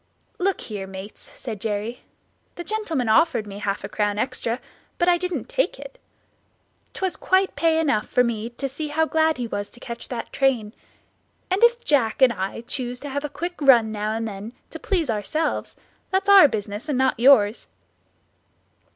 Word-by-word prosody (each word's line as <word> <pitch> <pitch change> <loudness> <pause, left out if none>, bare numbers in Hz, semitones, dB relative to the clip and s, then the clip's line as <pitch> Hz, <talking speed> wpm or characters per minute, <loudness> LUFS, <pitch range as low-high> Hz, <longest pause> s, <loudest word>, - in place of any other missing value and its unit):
"Look 385 +1 0
here, 200 -3 -6
mates," 190 +2 -10
said 220 -6 -7
Jerry; 220 +3 -3 0.5
"the 345 - -6
gentleman 345 - -2
offered 260 0 +3
me 200 -1 -8
half 200 -1 -2
a - - -3
crown 205 -1 -1
extra, 240 0 -2 0.4
but 345 - +1
I 350 -1 +4
didn't 360 0 -3
take - - 0
it; - - -11 1.0
'twas 380 -1 -1
quite 380 +1 +1
pay 325 -1 +2
enough 275 -10 +1
for 250 - +3
me 230 -1 -2
to 245 +3 -4
see 295 +4 -5
how 315 +2 +1
glad 315 0 +2
he 245 - -2
was 205 -3 -4
to 240 - -15
catch 235 -1 -7
that 240 -2 -6
train; 245 -6 +1 0.8
and 380 +4 +1
if 475 0 +4
Jack 255 -7 +2
and 260 -3 +6
I 195 +2 -4
choose 245 0 -5
to 285 - -6
have 285 +1 -3
a 295 - -3
quick 345 +3 -5
run 240 -6 +6
now 215 0 -2
and 225 0 -2
then 210 +2 -7 0.2
to - - -7
please 340 - 0
ourselves, 265 +10 -2 0.3
that's 385 +1 0
our 390 -6 +9
business 210 +2 -5
and 280 - 0
not 260 -3 +2
yours." 235 -4 +5
250 Hz, 180 wpm, -23 LUFS, 220-320 Hz, 1.0 s, our